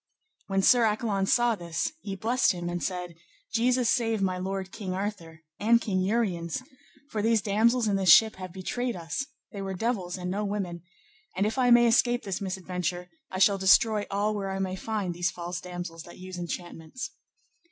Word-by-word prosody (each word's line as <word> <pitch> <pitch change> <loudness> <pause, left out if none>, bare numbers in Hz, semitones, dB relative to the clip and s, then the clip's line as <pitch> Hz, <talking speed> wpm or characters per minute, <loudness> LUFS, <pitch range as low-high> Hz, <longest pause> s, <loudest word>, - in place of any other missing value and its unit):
When 195 -1 +1
Sir 245 +2 +6
Accolon 210 -3 +1
saw 240 +1 +3
this, 170 - -3
he 195 -2 -5
blessed 230 +4 +2
him 175 -1 -4
and 175 0 -3
said, 180 -2 -3 0.4
Jesus 245 +2 +2
save 225 -2 +1
my 185 -2 0
lord 190 0 -4
King 190 -4 -5
Arthur, 185 -5 -5 0.2
and 230 +3 +4
King 195 -5 -1
Uriens, 190 -1 -1 0.5
for 215 - -1
these 225 +1 +3
damosels 225 +3 +2
in 200 -1 +2
this 190 -2 +1
ship 220 +5 +7
have 185 -1 -7
betrayed 240 +6 -3
us, 170 - -4 0.2
they 200 - -6
were 195 -1 -4
devils 190 -4 -2
and 180 0 -4
no 205 +2 -1
women; 195 -4 -3 0.5
and 195 +2 +1
if 225 +5 -1
I 250 -1 +4
may 240 0 +7
escape 240 +1 +3
this 195 -1 -3
misadventure, 180 -2 -3 0.2
I 185 - -5
shall 195 +1 +4
destroy 205 +2 +4
all 205 +2 0
where 200 -2 -3
I 190 - -3
may 190 -1 -2
find 200 -3 -3
these 175 +1 0
false 175 -1 -5
damosels 175 -2 -7
that 175 - -12
use 185 0 -8
enchantments. 175 +4 -6
195 Hz, 185 wpm, -28 LUFS, 180-225 Hz, 0.5 s, ship